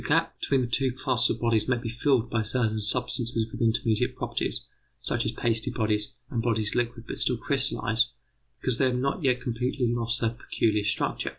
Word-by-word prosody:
The - - -7
gap - - +1
between 135 -2 +2
the 125 - -1
two 130 +2 +2
classes 125 -2 +1
of - - -1
bodies 115 -2 +2
may 130 -1 +2
be 120 -1 -4
filled 125 0 +2
by 110 - +1
certain 110 -1 0
substances 115 +1 +1
with - - -7
intermediate 115 -1 +1
properties, - - -2 0.4
such - - -1
as - - 0
pasty 115 +2 0
bodies 105 -3 0 0.2
and 115 - 0
bodies 110 -2 +1
liquid 120 -1 -1
but - - -6
still - - +2
crystallized, 115 +2 +1 0.5
because 130 -2 0
they 135 - +4
have 125 -1 +1
not 140 +6 -1
yet 125 -2 +2
completely 125 +1 -1
lost 120 0 0
their 115 -1 +1
peculiar 110 -2 0
structure. 105 - 0
120 Hz, 195 wpm, -27 LUFS, 110-125 Hz, 0.5 s, they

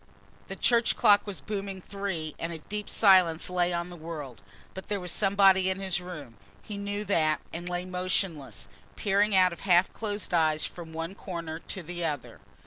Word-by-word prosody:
The - - -6
church 235 -1 +3
clock 205 0 +5
was 190 -8 -5
booming 195 -1 -4
three 185 -6 -4
and 165 - -3
a 165 - -4
deep 210 +6 -6
silence 185 -5 +4
lay 180 -1 +2
on 175 +1 -3
the - - -8
world. 155 -8 -7 0.3
But 190 - -8
there 205 -1 -1
was 180 -2 -2
somebody 195 -1 +4
in 190 0 -2
his 190 -2 -1
room. 150 -10 -9 0.3
He 210 - -7
knew 205 +1 -3
that 155 -6 +2
and 175 +2 -5
lay 180 0 -2
motionless, 180 -5 -2 0.3
peering 205 0 +2
out 185 -1 +5
of - - -11
half 180 -1 +3
closed 205 -4 -4
eyes 155 -2 +2
from 170 -2 -8
one 165 +3 -4
corner 170 -5 -6
to 185 +1 -5
the 175 +1 -5
other. 145 -5 -4
180 Hz, 185 wpm, -28 LUFS, 165-195 Hz, 0.3 s, clock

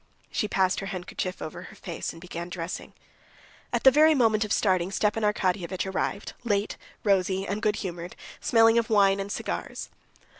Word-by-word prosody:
She 210 - 0
passed 190 -2 +2
her 195 - -5
handkerchief 185 0 -4
over 175 +3 -6
her 215 - -11
face 175 -4 -5
and 165 - -12
began 170 0 -6
dressing. 175 -1 -5 0.8
At - - 0
the 265 - +9
very 310 +3 +6
moment 225 -4 +3
of 210 - -5
starting 185 -4 +2
Stepan 210 +2 +1
Arkadyevitch 185 -3 0
arrived, 190 +1 -2
late, 205 -3 0 0.3
rosy 195 -1 +2
and 205 +2 -2
good 215 -1 +2
humored, 175 -3 -5 0.2
smelling 225 0 +5
of 230 - -2
wine 200 -2 +4
and 195 +1 -4
cigars. - - -4
195 Hz, 165 wpm, -27 LUFS, 185-215 Hz, 0.8 s, the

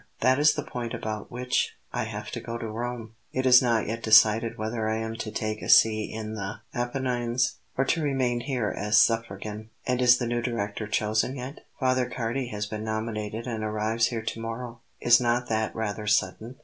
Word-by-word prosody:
"That 130 +1 +4
is 150 +1 +5
the 150 - -2
point 120 -2 -5
about 110 -1 -5
which 125 +1 -1 0.2
I - - -1
have - - -6
to - - -4
go 115 0 -5
to 115 - -5
Rome. 115 0 -5 0.2
It 130 0 -1
is 125 -1 +8
not 115 -3 +2
yet 115 +2 -4
decided 110 +1 +5
whether 110 0 -2
I 110 - 0
am 110 0 -3
to 110 - -4
take 110 0 -3
a - - -6
see 110 -1 +5
in 110 0 -5
the 105 +1 -5
Apennines, 120 0 -1 0.2
or 135 - +2
to 165 - +1
remain 130 -4 0
here 120 -4 -2
as 105 +1 +2
Suffragan." 110 -1 +1 0.2
"And 125 0 0
is 125 0 +6
the 125 - -2
new 120 0 -1
Director 110 -3 -3
chosen 110 +4 0
yet?" 130 +2 -8
"Father 130 -1 +1
Cardi 125 +2 -2
has 105 -2 -3
been 105 +1 -5
nominated 110 0 -3
and 115 -3 -3
arrives 110 +2 +1
here 115 -2 -4
to 115 - -4
morrow." 115 +1 -6 0.2
"Is 120 0 +5
not 120 0 +1
that 110 -1 -1
rather 105 -1 -3
sudden?" 105 +4 0
115 Hz, 200 wpm, -27 LUFS, 110-125 Hz, 0.2 s, is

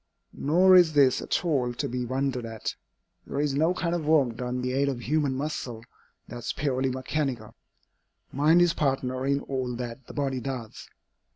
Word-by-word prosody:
Nor 180 +6 +4
is 175 -3 +6
this 140 -3 +4
at - - -1
all 130 -7 +1
to - - -2
be 125 0 -3
wondered 130 0 -1
at. 115 -1 -4 0.5
There 140 - -3
is 145 -1 +1
no 160 +5 +2
kind 170 -1 -1
of 165 -4 -2
work, 140 -7 +3
done 125 +1 -4
by - - -3
the 125 0 -1
aid 140 +1 +2
of 125 -3 -4
human 145 0 0
muscle, 130 -5 -4 0.4
that 120 - -7
is 120 - -3
purely 135 -2 0
mechanical. 130 0 -3 0.8
Mind 155 +5 +4
is 175 -1 +2
partner 135 -3 -1
in 140 0 +1
all 130 -2 -3
that 120 +1 -7
the - - -10
body 135 -3 -1
does. 125 -3 -6
135 Hz, 185 wpm, -27 LUFS, 125-150 Hz, 0.8 s, is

